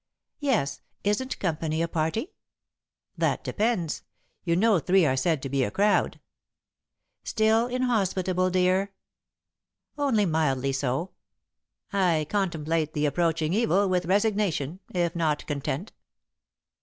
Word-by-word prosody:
"Yes. 225 - 0 0.2
Isn't 210 +6 -1
company 160 -3 -1
a - - 0
party?" 165 - -2 0.8
"That - - 0
depends. 210 -8 -1 0.4
You 170 -2 +1
know 210 0 +4
three 185 +2 +3
are 130 -3 +2
said 150 +1 0
to - - -2
be 135 0 +1
a 105 - 0
crowd." 205 - +1 1.0
"Still 220 +1 +2
inhospitable, 190 -7 0
dear?" 185 +2 +1 1.1
"Only 245 -8 +2
mildly 140 -5 +1
so. 135 +6 -1 0.8
I 175 -6 +2
contemplate 165 -5 -1
the 150 0 +1
approaching 160 +1 +1
evil 205 -2 +2
with 180 -1 0
resignation, 195 -6 +1
if 175 -1 -1
not 155 -3 0
content." 145 +5 -3
180 Hz, 115 wpm, -26 LUFS, 155-205 Hz, 1.1 s, know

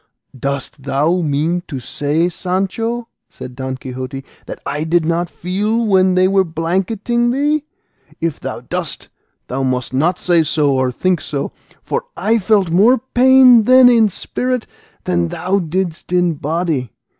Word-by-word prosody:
"Dost 140 +2 -4
thou 150 +6 0
mean 160 +3 0
to 135 -5 -5
say 145 +5 -1
now, 175 - +2
Sancho," 195 +7 -2 0.2
said 125 - -10
Don 130 0 -4
Quixote, 130 +1 -7 0.2
"that - - -7
I 150 +1 -2
did 165 0 +1
not 170 +1 -1
feel 210 +7 -1
when 190 -3 +3
they 185 0 +4
were 195 0 +3
blanketing 190 +8 -1
thee? 290 +4 0 0.5
If 165 -3 -2
thou - - -6
dost, - - -5 0.4
thou 130 +2 -4
must 130 -1 -2
not 165 +7 +1
say 175 -2 +3
so 150 -2 +1
or 130 -1 +1
think 180 +6 0
so, 140 -2 -4 0.3
for - - -3
I 220 +5 +1
felt 200 -3 +2
more 215 +9 +5
pain 255 -1 +5
then 255 0 +7
in 230 -3 +4
spirit 250 +5 -3 0.4
than 85 -1 0
thou 185 - -1
didst 175 0 -3
in 175 -1 +2
body. 155 - -2
175 Hz, 155 wpm, -17 LUFS, 145-215 Hz, 0.5 s, then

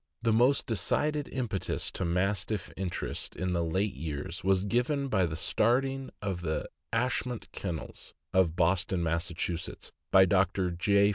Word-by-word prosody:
The 115 -2 +3
most 125 +5 +4
decided 145 - +1
impetus 120 -8 -2
to - - -2
Mastiff 95 +4 -1
interests 95 -2 -4
of 95 0 -1
late 90 +4 0
years 80 +3 -5
was 95 0 +3
given 135 +6 +1
by 95 -6 +2
the 80 - -4
starting 130 +9 +1
of 95 -3 -2
the 80 -3 -2 0.2
Ashmont 125 0 -1
Kennels, 85 -5 -6 0.2
of 90 -3 +3
Boston, 90 +1 +2
Mass., 85 +1 0 0.8
by 95 0 +8
Dr. 95 0 +2
J. 100 +3 +3
95 Hz, 135 wpm, -30 LUFS, 85-115 Hz, 0.8 s, by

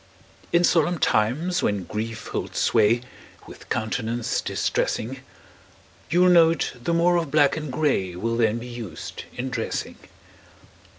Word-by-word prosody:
In 170 +1 +4
solemn 175 0 +3
times, 140 +10 +1
when 100 -2 0
grief 110 +4 -5
holds - - -4
sway 115 +2 +3 0.4
With - - -13
countenance 115 +1 -1
distressing, 130 +4 -1 0.9
You'll 180 +4 +4
note 165 -3 +4
the 150 - -1
more 170 +1 +3
of 165 -4 -1
black 145 -1 +4
and 155 -3 -5
gray 125 - 0
Will 115 +5 -2
then 115 -1 +2
be 120 - -7
used 115 -9 -7
in 130 +1 -4
dressing. - - -3
125 Hz, 130 wpm, -24 LUFS, 110-165 Hz, 0.9 s, In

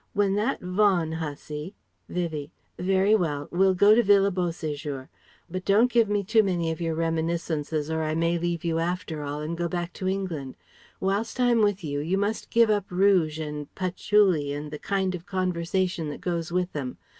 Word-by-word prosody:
When 200 -1 +2
that 210 +3 0
Vaughan 180 -3 +2
hussy..." 150 +2 -5 0.3
Vivie: 160 -4 -3 0.3
"Very 190 +3 +3
well. 150 -8 0
We'll 190 +2 +3
go 205 +4 +6
to 235 - +5
Villa 200 -2 +4
Beau 180 -1 0
séjour. 145 -4 -5 0.4
But 185 +1 -5
don't 220 +6 +4
give 230 -3 +3
me 205 -1 +1
too 220 +3 +4
many 175 -5 0
of 160 - -5
your 165 -1 -1
reminiscences 160 -2 -1
or 160 0 0
I 155 0 -1
may 165 +1 +1
leave 170 -1 -2
you 165 -1 +1
after 165 -2 -2
all 145 +1 -4
and 155 +2 -3
go 170 0 -1
back 175 0 -3
to 185 - -1
England. 175 -9 -3 0.4
Whilst 205 +6 -1
I'm 240 -2 +4
with 205 -3 +1
you, 145 -2 -2
you 170 +6 0
must 205 +2 -2
give 230 -1 +4
up 205 -2 0
rouge 180 -4 +3
and 150 -2 -5
patchouli 185 -4 +2
and 145 +1 -5
the 150 - -6
kind 190 -2 -1
of 175 -1 -7
conversation 180 -2 -1
that 145 - -6
goes 170 -2 -3
with 180 +1 -1
them. 135 -4 -4
175 Hz, 190 wpm, -26 LUFS, 160-195 Hz, 0.4 s, go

